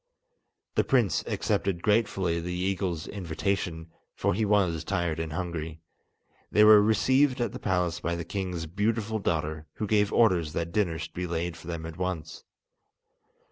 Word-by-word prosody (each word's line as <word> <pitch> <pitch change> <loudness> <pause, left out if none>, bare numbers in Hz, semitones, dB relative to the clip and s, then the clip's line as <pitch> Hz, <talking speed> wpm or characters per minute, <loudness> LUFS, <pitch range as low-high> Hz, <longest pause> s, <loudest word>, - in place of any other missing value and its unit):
The - - +2
prince 120 -8 +2
accepted 95 -3 -1
gratefully 95 -6 +1
the 90 +1 -4
eagle's 90 -3 -1
invitation, 85 -3 -3 0.2
for - - +1
he 110 +4 0
was 95 -6 +2
tired 80 -1 -1
and 80 -1 -3
hungry. 80 -2 -4 0.7
They 105 - +5
were 105 -1 +9
received 130 +6 +3
at 120 - 0
the - - -7
palace 90 -3 0
by 85 - -2
the 85 -1 -5
king's 90 -4 -3
beautiful 110 +5 -1
daughter, 80 -4 -2
who 110 - -3
gave 105 -1 +2
orders 90 -9 +3
that 85 +1 -2
dinner 90 -5 0
should 80 - -7
be 90 0 -3
laid 85 0 -2
for 80 0 -13
them 85 -2 -4
at 80 -1 -8
once. 90 -3 -4
90 Hz, 160 wpm, -28 LUFS, 80-105 Hz, 0.7 s, were